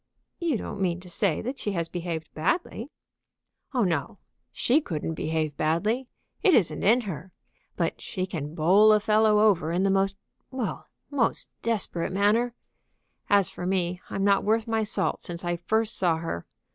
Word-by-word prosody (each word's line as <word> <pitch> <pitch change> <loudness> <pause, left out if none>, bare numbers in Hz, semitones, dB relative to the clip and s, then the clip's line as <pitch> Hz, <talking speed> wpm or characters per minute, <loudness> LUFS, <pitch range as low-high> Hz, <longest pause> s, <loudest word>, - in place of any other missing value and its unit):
"You 330 -8 +1
don't 200 - -6
mean 175 -2 0
to 180 - -12
say 180 -4 0
that 255 +3 -4
she 205 - -2
has 170 -3 -1
behaved 165 -2 -5
badly?" 235 - -1 0.8
"Oh 250 -4 +2
no! 180 +4 -1 0.3
She 275 +6 +2
couldn't 165 - -3
behave 155 -2 -2
badly; 210 +12 0 0.3
it 380 -7 +5
isn't 190 -8 +2
in 235 +5 +4
her. 190 -3 -6 0.4
But - - -1
she 185 -4 -3
can 155 -4 -5
bowl 190 +7 +6
a 210 - +5
fellow 215 0 +4
over 185 -7 +3
in 180 +3 +1
the 195 - +3
most 195 0 +1 0.3
well, 250 -6 -4 0.2
most 265 -5 +1
desperate 200 -6 -1
manner. 215 +5 +2 0.7
As 200 -3 +4
for 180 - -5
me, 180 -1 0
I'm 195 - -2
not 200 0 +4
worth 220 +1 +1
my 225 -1 +1
salt 215 - -1
since 175 0 -6
I 175 0 0
first 220 +6 0
saw 170 -3 +2
her. 160 - -5
195 Hz, 170 wpm, -26 LUFS, 170-220 Hz, 0.8 s, bowl